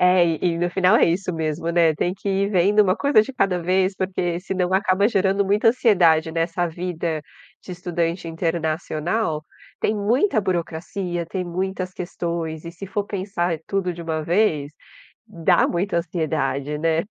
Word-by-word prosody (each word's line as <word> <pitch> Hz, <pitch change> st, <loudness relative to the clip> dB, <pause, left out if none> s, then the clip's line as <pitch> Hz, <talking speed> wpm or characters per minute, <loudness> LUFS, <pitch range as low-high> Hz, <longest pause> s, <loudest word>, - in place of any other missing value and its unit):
É, 180 Hz, 0 st, +5 dB
e 165 Hz, -2 st, 0 dB, 0.2 s
e 165 Hz, -, -4 dB
no 175 Hz, 0 st, 0 dB
final 185 Hz, +3 st, +4 dB
é -, -, +5 dB
isso 180 Hz, +2 st, 0 dB
mesmo, 160 Hz, 0 st, -2 dB
né, 170 Hz, -2 st, +4 dB
tem 175 Hz, +4 st, -1 dB
que 200 Hz, -, -6 dB
ir 195 Hz, +1 st, +1 dB
vendo 200 Hz, +2 st, +4 dB
uma 185 Hz, -1 st, +2 dB
coisa 280 Hz, -5 st, +4 dB
de 220 Hz, +6 st, -3 dB
cada 195 Hz, -8 st, +1 dB
vez, 185 Hz, +2 st, +1 dB
porque 180 Hz, -2 st, -1 dB
senão 185 Hz, -1 st, -2 dB
acaba 195 Hz, +1 st, +3 dB
gerando 195 Hz, -2 st, +2 dB
muita 205 Hz, +4 st, +3 dB
ansiedade 175 Hz, -10 st, +4 dB
nessa 165 Hz, +2 st, -1 dB
vida 165 Hz, -2 st, -3 dB, 0.4 s
de 185 Hz, -, -7 dB
estudante 170 Hz, -1 st, -2 dB
internacional. 165 Hz, +1 st, -2 dB, 0.4 s
Tem 215 Hz, -, +1 dB
muita 225 Hz, -, +2 dB
burocracia, 175 Hz, 0 st, -3 dB
tem 180 Hz, +2 st, -3 dB
muitas 185 Hz, +1 st, -3 dB
questões 170 Hz, -3 st, -4 dB
e 170 Hz, -, -6 dB
se 195 Hz, +4 st, -8 dB
for 200 Hz, +2 st, -2 dB
pensar 185 Hz, -4 st, -2 dB
tudo 195 Hz, -2 st, -1 dB
de 170 Hz, -, -9 dB
1 160 Hz, -1 st, -2 dB
vez, 155 Hz, -4 st, +1 dB, 0.6 s
dá 170 Hz, +1 st, +2 dB
muita 175 Hz, +1 st, -1 dB
ansiedade, 155 Hz, -4 st, -2 dB
né. 165 Hz, +1 st, +1 dB
175 Hz, 165 wpm, -22 LUFS, 165-195 Hz, 0.6 s, É